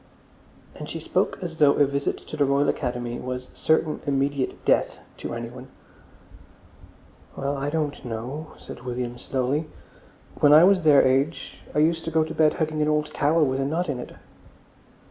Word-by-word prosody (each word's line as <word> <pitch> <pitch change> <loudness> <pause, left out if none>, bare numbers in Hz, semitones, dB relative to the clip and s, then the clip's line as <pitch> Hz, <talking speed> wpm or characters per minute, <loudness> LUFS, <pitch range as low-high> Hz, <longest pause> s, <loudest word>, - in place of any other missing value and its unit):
And - - -8
she - - -5
spoke - - 0
as 165 -2 -5
though 145 -2 +5
a 145 - +4
visit 140 +1 -2
to - - -6
the 150 - +2
Royal 140 +1 +2
Academy 120 -1 -3
was 125 0 -5
certain 160 -1 +1
immediate 140 -1 -1
death - - +2 0.2
to - - -5
anyone.... 120 +2 -7 1.7
"Well, 140 +1 -2
I 140 +1 -2
don't 150 -2 -2
know," 125 +6 -6
said - - -10
William 125 -1 -4
slowly. 135 +4 -1 0.7
"When 145 0 +6
I 155 +2 +9
was 190 0 +5
their 150 -4 +6
age 135 +5 0 0.2
I 150 +1 +5
used 165 0 0
to - - -2
go 160 -1 +2
to 160 0 -6
bed 155 -1 +3
hugging 155 -1 -2
an 150 - +2
old 150 0 0
towel 155 +2 +3
with 130 0 -1
a 135 - 0
knot 165 +4 -1
in 130 -3 -2
it." - - -9
145 Hz, 175 wpm, -24 LUFS, 130-155 Hz, 1.7 s, I